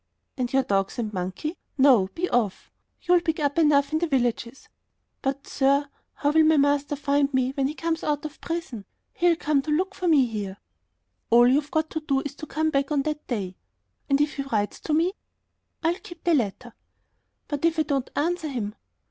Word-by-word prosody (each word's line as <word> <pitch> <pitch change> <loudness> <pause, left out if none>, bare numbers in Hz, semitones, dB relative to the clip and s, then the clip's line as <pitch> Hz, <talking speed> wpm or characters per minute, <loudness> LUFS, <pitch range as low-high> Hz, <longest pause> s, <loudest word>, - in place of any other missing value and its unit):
"And 250 -2 -2
your 270 0 +3
dogs 195 -3 0
and 220 -3 -3
monkey! 190 - -4 0.2
No, 260 -8 +5
be 360 +2 -1
off! 225 - -1 0.3
You'll 355 0 +4
pick 325 -2 -1
up 290 +1 0
enough 290 -2 +3
in 315 - +2
the 340 - 0
villages." 245 -2 -1 0.5
"But, 275 +1 -2
sir, 280 +1 +1 0.3
how 290 - +1
will 320 +1 +5
my 315 0 +4
master 285 0 +2
find 285 0 +1
me 260 -1 +1
when 270 0 0
he 300 - -5
comes 330 0 -2
out 295 0 -1
of 305 0 -8
prison? 330 -11 -5 0.3
He'll 345 -1 +3
come 300 -3 +1
to 305 - -8
look 370 +6 0
for 365 - -3
me 295 -6 +5
here." 205 -4 -5 0.7
"All 240 +1 +6
you've 285 +3 +2
got 315 0 -1
to 315 - -2
do 275 -3 0
is 285 - -6
to 310 - -8
come 315 +2 0
back 275 0 0
on 285 -2 +2
that 305 0 -4
day." 195 -7 -3 0.5
"And 275 0 +3
if 295 0 0
he - - -1
writes 215 -7 -2
to 310 - -3
me?" 340 +4 +2 0.7
"I'll 335 +3 +1
keep 345 - -12
the 345 - +3
letter." 240 -2 -1 0.7
"But 290 0 -4
if 335 0 +2
I 315 - +3
don't 275 -3 -1
answer 335 +2 0
him?..." 230 -7 -3
285 Hz, 200 wpm, -25 LUFS, 255-315 Hz, 0.7 s, All